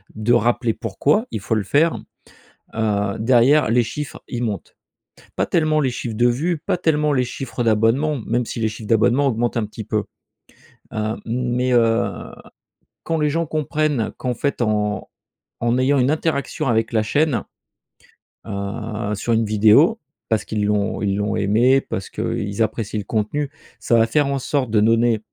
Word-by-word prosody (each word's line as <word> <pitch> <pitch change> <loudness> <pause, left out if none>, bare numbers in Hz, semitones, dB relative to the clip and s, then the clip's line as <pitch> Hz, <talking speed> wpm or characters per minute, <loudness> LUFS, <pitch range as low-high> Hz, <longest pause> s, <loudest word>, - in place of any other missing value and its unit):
de 110 +3 +1
rappeler 120 0 +2
pourquoi 140 - 0
il - - -3
faut 110 +3 -1
le 105 - 0
faire, 150 - +2 0.8
heu, 105 -3 0
derrière 125 +3 +4
les 120 +1 +4
chiffres, 145 +5 -6
ils 120 -1 -4
montent. 105 -3 -5 0.6
Pas - - +1
tellement 155 -2 +1
les 130 -3 +1
chiffres 120 -2 -5
de 120 +2 +3
vues, 155 +8 0
pas 180 +4 -2
tellement, 150 -3 +1
les 130 -2 +2
chiffres 120 0 -5
d'abonnements, 115 +7 +2
même 120 +1 0
si 115 - -5
les 110 - +1
chiffres 105 0 -9
d'abonnements 120 +5 +3
augmentent 120 -1 0
un 110 - 0
petit 110 +1 -8
peu, - - -1 0.9
hem, 110 +1 -3
mais, 125 +1 -1
heu, 115 -1 +1 0.7
quand 165 -1 -1
les 150 -1 +1
gens 165 +2 -1
comprennent 150 -5 -1
qu'en 125 -1 -2
fait 140 0 -2
en 105 -2 -1 0.5
en 120 +1 +2
ayant 135 +2 +3
une 130 +2 +3
interaction 155 -2 -1
avec 115 0 +1
la 110 - +2
chaîne, 145 +4 +1 1.0
heu, 105 +1 -4
sur 115 +3 -1
une 115 0 +2
vidéo 110 - +4 0.3
parce 110 -1 +1
qu'ils 105 -1 -2
l'ont 105 -1 0
ils 100 -2 0
l'ont 105 +1 -1
aimée 120 +7 +3
parce 95 - -5
qu’ils 100 +2 -3
apprécient 110 0 -3
le 100 - -6
contenu, 120 +8 -1 0.3
ça 120 - +1
va 115 0 +4
faire 145 +4 +2
en 140 0 -1
sorte 130 -3 -1
de 110 - +3
donner, 115 0 +3
120 Hz, 170 wpm, -21 LUFS, 110-140 Hz, 1.0 s, derrière